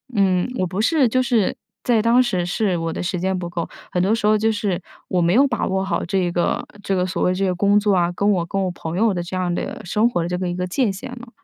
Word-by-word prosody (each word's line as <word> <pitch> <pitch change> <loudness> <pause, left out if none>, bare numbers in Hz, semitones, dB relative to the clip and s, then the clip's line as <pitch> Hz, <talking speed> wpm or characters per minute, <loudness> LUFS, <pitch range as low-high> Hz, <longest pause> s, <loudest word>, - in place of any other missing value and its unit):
嗯， 190 -1 +2
我 185 - +2
不 185 +4 -4
是 280 0 +3
就 255 +2 +2
是 235 -7 +1 0.3
在 230 -3 +3
当 240 +2 +5
时 185 -8 0
是 185 0 0
我 165 0 -2
的 - - -4
时 180 0 -2
间 190 +1 0
不 175 -1 -4
够， 170 -1 -3 0.2
很 180 - 0
多 205 +4 +2
时 220 -2 +1
候 215 0 +4
就 220 +1 +2
是 200 -4 -1 0.3
我 180 -1 +1
没 170 +2 +3
有 275 +4 +5
把 - - -1
握 190 0 0
好 190 -3 -1
这 180 -1 0
个 175 0 0 0.2
这 195 - 0
个 180 - +1
所 185 - -2
谓 180 - +3
这 195 +1 0
个 180 -1 0
工 200 +2 +3
作 205 -2 +2
啊， 175 -1 +2
跟 205 +1 +2
我 175 -3 +1
跟 195 +2 -1
我 185 - 0
朋 165 -1 -6
友 225 0 +3
的 175 -1 -2
这 180 +2 -6
样 180 -1 0
的 - - -4
生 215 +6 +2
活 175 - -1
的 - - -2
这 180 - -1
个 180 -1 -2
一 175 - -3
个 180 0 -2
界 215 +3 +1
限 205 +7 -7
了。 245 -1 -9
190 Hz, 310 characters per minute, -21 LUFS, 180-215 Hz, 0.3 s, 当